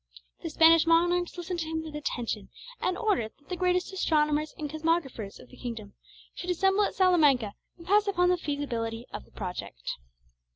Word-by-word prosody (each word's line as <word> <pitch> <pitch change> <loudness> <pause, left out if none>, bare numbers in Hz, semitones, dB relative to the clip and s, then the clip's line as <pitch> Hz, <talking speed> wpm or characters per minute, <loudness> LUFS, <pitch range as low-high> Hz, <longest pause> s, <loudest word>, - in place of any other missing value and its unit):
The - - -4
Spanish 325 0 +6
monarchs 350 +2 +3
listened 350 0 -4
to 320 - -2
him 320 0 -2
with 310 -1 -8
attention, 235 -8 -3 0.3
and 365 - 0
ordered 375 - 0
that 285 - -28
the 365 - -2
greatest 360 +1 0
astronomers 305 -4 +1
and 300 - -3
cosmographers 310 -9 -1
of - - -14
the - - -15
kingdom 225 -5 -6 0.4
should 360 - -6
assemble 385 +3 +3
at - - -4
Salamanca 295 - +4 0.2
and 335 - -13
pass 410 +3 +4
upon 360 -2 +3
the 360 - +3
feasibility 240 -7 -3
of - - -6
the - - -24
project. 180 - -5
320 Hz, 175 wpm, -28 LUFS, 250-360 Hz, 0.4 s, Spanish